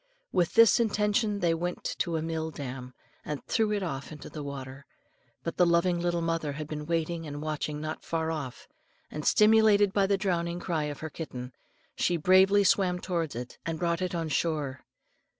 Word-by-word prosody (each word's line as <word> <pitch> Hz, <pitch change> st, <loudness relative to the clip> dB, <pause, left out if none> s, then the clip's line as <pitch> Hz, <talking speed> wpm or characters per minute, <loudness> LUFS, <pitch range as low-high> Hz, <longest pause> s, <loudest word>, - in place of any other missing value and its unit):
With 175 Hz, -2 st, +1 dB
this 230 Hz, -2 st, +7 dB
intention 210 Hz, -1 st, +1 dB
they 170 Hz, -1 st, +3 dB
went 175 Hz, +2 st, -3 dB, 0.2 s
to 170 Hz, -2 st, 0 dB
a 155 Hz, -, -2 dB
mill 160 Hz, -1 st, -2 dB
dam, 130 Hz, -4 st, -7 dB, 0.3 s
and 150 Hz, -2 st, -5 dB
threw 220 Hz, -2 st, +1 dB
it 205 Hz, -1 st, 0 dB
far 150 Hz, -8 st, -3 dB
into 150 Hz, -2 st, -10 dB
the 155 Hz, -, -6 dB
water. 140 Hz, -1 st, -7 dB, 0.6 s
But 165 Hz, -, -4 dB
the 180 Hz, -, +5 dB
loving 170 Hz, +1 st, +3 dB
little 175 Hz, -1 st, 0 dB
mother 165 Hz, -3 st, -1 dB
had 150 Hz, +1 st, -6 dB
been 150 Hz, -1 st, -5 dB
waiting 165 Hz, 0 st, -1 dB
and 145 Hz, 0 st, -6 dB
watching 150 Hz, -1 st, -3 dB
not 155 Hz, +1 st, -5 dB
far 160 Hz, -1 st, -1 dB
off, 140 Hz, -6 st, -6 dB, 0.4 s
and, 150 Hz, -, -5 dB
stimulated 210 Hz, -2 st, +5 dB
by 200 Hz, -1 st, +3 dB
the 200 Hz, 0 st, +2 dB
drowning 175 Hz, -3 st, -1 dB
cry 165 Hz, -4 st, -1 dB
of 145 Hz, -1 st, -6 dB
her 160 Hz, -1 st, -5 dB
kitten, 125 Hz, -6 st, -7 dB, 0.4 s
she 175 Hz, -, +1 dB
bravely 190 Hz, +4 st, +5 dB
swam 185 Hz, -2 st, +3 dB
towards 170 Hz, -5 st, -2 dB
it, 125 Hz, +1 st, -7 dB
and 165 Hz, -1 st, -3 dB
brought 170 Hz, +1 st, 0 dB
it 180 Hz, -1 st, -2 dB
on 165 Hz, -2 st, -2 dB
shore. 150 Hz, -4 st, -1 dB
165 Hz, 185 wpm, -29 LUFS, 150-185 Hz, 0.6 s, this